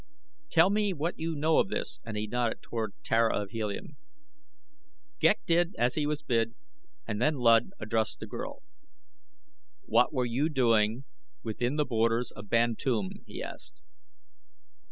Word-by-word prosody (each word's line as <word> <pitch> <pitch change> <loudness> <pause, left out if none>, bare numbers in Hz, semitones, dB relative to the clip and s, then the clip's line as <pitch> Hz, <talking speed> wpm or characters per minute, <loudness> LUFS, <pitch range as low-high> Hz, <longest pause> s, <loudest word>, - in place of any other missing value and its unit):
"Tell 165 +4 +5
me 205 -1 +1
what 165 +2 -3
you 165 0 -2
know 155 +2 +3
of - - +3
this," 195 - -4
and 115 -2 -5
he 105 - -1
nodded 120 +1 -1
toward 110 -4 -4
Tara 115 -1 +2
of 100 -1 -5
Helium. 110 -3 -4 1.2
Ghek 210 - +4
did 175 +2 +2
as 120 +1 +2
he 150 0 0
was 150 0 -2
bid 115 -5 0 0.5
and 105 - -3
then 150 +4 +3
Luud 115 +2 +4
addressed 110 +1 -1
the - - -6
girl. 280 - -7 1.2
"What - - +3
were 130 -4 0
you 130 +6 0
doing 115 -3 +2 0.4
within 120 +4 -2
the 150 -1 +1
borders 115 0 +1
of 105 -1 -11
Bantoom?" 120 - 0
he - - -6
asked. - - -10
120 Hz, 150 wpm, -29 LUFS, 115-155 Hz, 1.2 s, Tell